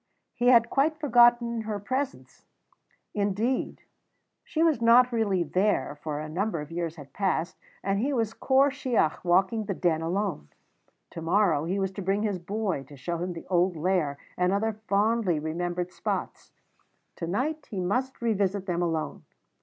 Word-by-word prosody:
He 245 -1 0
had 235 -2 +6
quite 305 +3 +2
forgotten 240 -4 +4
her 215 -1 -3
presence; 260 +7 -4 0.7
indeed, 210 +5 -1 0.6
she 320 - 0
was 315 -8 +2
not 245 +2 +6
really 205 -6 +1
there, 180 -2 0
for 150 -2 -3
a 155 - -5
number 175 +3 -2
of 150 +1 -7
years 165 -1 -3
had 140 -4 -12
passed, 185 -3 -1 0.3
and 195 +1 0
he 270 +6 0
was 225 -4 0
Corp 270 +1 +3
Shiach, 250 - 0
walking 190 +5 +2
the 195 - -3
Den 165 -3 +1
alone. 175 - -2 0.6
To 165 - -7
morrow 165 -3 +2
he 185 +4 -1
was 190 -1 -1
to 200 - -6
bring 195 +3 0
his 205 -4 -1
boy 195 -3 -2
to 140 +2 -14
show 170 +6 -3
him 180 +1 -3
the 165 - -9
old 180 0 +2
Lair 160 -3 0 0.2
and 180 0 +2
other 220 +3 0
fondly 205 -3 +2
remembered 175 +3 -3
spots; - - -4 0.7
to 165 - -4
night 285 - -2
he 200 - -4
must 250 +8 -1
revisit 200 -3 0
them 175 -2 -1
alone. 165 -2 -2
195 Hz, 165 wpm, -27 LUFS, 175-230 Hz, 0.7 s, had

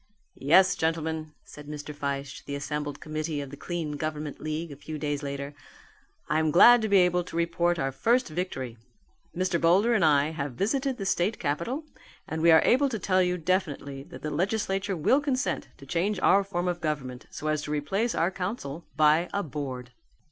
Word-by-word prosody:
"Yes, 185 +7 +5
gentlemen," 160 -1 -2
said 150 0 -12
Mr. 150 0 -6
Fyshe 140 -1 -4
to - - -23
the 140 - -3
assembled 145 0 -4
committee 155 0 -3
of 140 -2 -6
the - - -7
Clean 165 0 -4
Government 150 -1 -4
League 155 +1 -3
a - - -7
few 155 +2 -7
days 145 -1 -2
later, 140 0 -5 0.7
"I 155 - +1
am 160 0 +2
glad 240 +9 +8
to 220 - -1
be 200 - +5
able 180 -1 +3
to 175 - -10
report 170 +1 +1
our 135 -3 -1
first 235 - +2
victory. 150 -8 -4 0.6
Mr. 180 -2 0
Boulder 195 +8 +4
and 205 -7 +3
I 150 -1 +4
have 140 -4 -4
visited 260 - 0
the 195 - -4
state 190 +3 +1
capital 170 - -2 0.4
and 160 0 -3
we 170 - +5
are 160 -1 +7
able 275 +3 +4
to 230 - -3
tell 185 -1 +2
you 180 0 +1
definitely 155 -6 -2
that - - -12
the 155 - -3
legislature 195 +2 -1
will 255 - +3
consent 260 -3 -1
to 140 - -13
change 180 +8 -1
our 200 +1 +5
form 180 -2 -3
of 175 -1 -2
government 135 -5 -3
so - - -8
as 155 -1 +1
to 150 - -6
replace 195 +11 -1
our 165 +3 +1
council 180 - -5
by 155 +3 +4
a 200 - 0
Board." 130 -5 -6
160 Hz, 195 wpm, -27 LUFS, 145-190 Hz, 0.7 s, glad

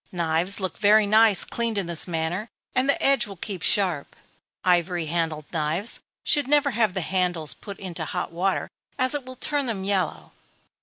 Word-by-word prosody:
Knives 170 +2 +2
look 185 -3 -4
very 210 +1 +5
nice 215 -1 +5
cleaned 230 -2 -3
in 195 - -1
this 170 0 0
manner, 175 +6 -2 0.2
and 255 +2 +1
the 280 - +3
edge 270 -4 +3
will 200 - -9
keep 190 0 -6
sharp. 180 -9 0 0.5
Ivory 175 -1 +1
handled 160 -2 -2
knives 165 +7 +1 0.2
should 290 -3 +1
never 290 0 +3
have 220 -5 +1
the 190 - -1
handles 175 -5 -1
put 200 -1 -10
into 175 -4 -6
hot - - -4
water, 185 +3 -1 0.3
as 255 +1 +3
it 290 -3 -4
will 255 0 -9
turn 285 +1 0
them 205 -5 -3
yellow. 190 -4 -1
190 Hz, 175 wpm, -24 LUFS, 170-225 Hz, 0.5 s, very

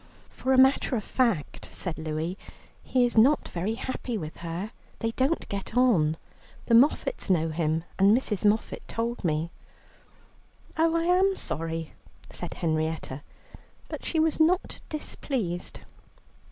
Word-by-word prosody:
"For 260 - -2
a 260 - +5
matter 265 0 +5
of 215 - -2
fact," 230 - -1
said 175 -4 -2
Louie, 160 +3 -3 0.5
"he 250 -2 +2
is 240 -2 +3
not 275 +6 +4
very 190 +6 -2
happy 250 -1 -4
with 155 -5 -6
her; 170 +5 -5 0.3
they 225 - -1
don't 265 +8 0
get 200 +4 -4
on. 170 -12 +4 0.5
The 235 - +1
Moffats 265 - +3
know 165 -3 +3
him, 160 0 0 0.2
and 195 +1 +6
Mrs. 215 -6 -2
Moffatt 210 +1 +1
told 230 0 -3
me." 160 0 0 1.2
"Oh, 325 +1 +2
I 335 - +2
am 370 +3 +3
sorry," 165 - -3 0.4
said - - -6
Henrietta, 155 -4 -2 0.7
but - - -6
she 325 - 0
was 320 0 +2
not 345 +4 +2
displeased. 235 - -3
220 Hz, 140 wpm, -27 LUFS, 165-265 Hz, 1.2 s, and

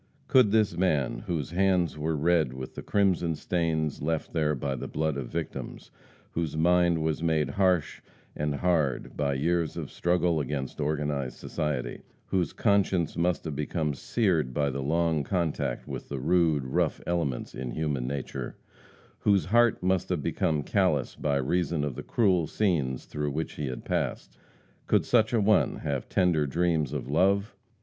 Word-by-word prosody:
Could 130 -5 +5
this 110 -1 +3
man, 75 -9 0
whose 80 -4 -2
hands 90 -4 +2
were 80 +1 -1
red 80 -3 +2
with 65 -1 -7
the - - -7
crimson 90 -5 +1
stains 80 -3 -1
left 80 +1 -2
there 75 -2 +1
by 70 +1 -2
the - - -5
blood 80 -1 -1
of 70 -3 -4
victims; - - -6 0.4
whose 80 -2 -2
mind 85 0 +3
was 80 0 -1
made 80 -4 +1
harsh 90 -3 +1 0.3
and 75 -1 -1
hard 80 -5 0
by 70 -2 0
years 85 +3 0
of - - -5
struggle 85 -2 +1
against 70 0 -3
organized 75 -3 -1
society; 75 -5 -3 0.2
whose 90 -3 0
conscience 95 -5 +1
must 85 +1 0
have 75 -3 -3
become 75 +1 -1
seared 80 - 0
by 70 -1 +1
the 70 +1 -3
long 80 +1 +1
contact 75 -7 -2
with - - -6
the 70 - -3
rude, 80 -1 +2
rough 65 - 0
elements 80 -8 -2
in 65 -1 -5
human 70 -2 -2
nature; 70 0 -4 0.6
whose 100 -2 +3
heart 120 0 +3
must 95 -1 +1
have 85 -6 -1
become 75 -2 0
callous - - +1
by 70 -2 -1
reason 80 +3 0
of 75 -2 -2
the - - -6
cruel 95 -8 +2
scenes 75 - 0
through 75 -1 -3
which 80 +3 -3
he 75 - -4
had 65 -1 -6
passed - - -2 0.5
could - - +3
such 110 -2 +3
a 120 - +2
one 105 +1 +3
have 70 -3 -3
tender 85 -6 +2
dreams 80 -2 +1
of 75 -4 -4
love? 100 - +2
80 Hz, 165 wpm, -28 LUFS, 70-90 Hz, 0.6 s, Could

